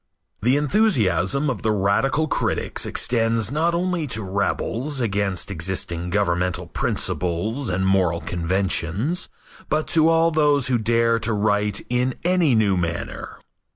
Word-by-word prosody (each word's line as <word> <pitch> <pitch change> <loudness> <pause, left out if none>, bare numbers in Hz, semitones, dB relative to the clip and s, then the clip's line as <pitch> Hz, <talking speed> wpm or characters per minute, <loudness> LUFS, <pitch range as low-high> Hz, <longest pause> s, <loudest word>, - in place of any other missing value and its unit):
The 125 +6 +3
enthusiasm 145 - +1
of 130 -7 -2
the 110 - 0
radical 105 +10 +1
critics - - -2
extends 115 -2 0
not 165 +4 +1
only 175 -3 -1
to 110 -4 -2
rebels 115 +8 -2
against 100 -5 -1
existing 85 -1 -2
governmental 90 -2 0
principles 105 +10 -2
and 95 +1 -1
moral 95 -3 +2
conventions, 95 - -1 0.4
but 155 0 0
to 160 0 +4
all 165 0 +3
those 145 -4 +2
who 125 -2 +2
dare 115 +1 +2
to 110 +1 0
write 105 -1 0
in 125 +1 0
any 175 -7 +2
new 105 -3 +2
manner. 85 -1 -4
115 Hz, 130 wpm, -22 LUFS, 95-145 Hz, 0.4 s, to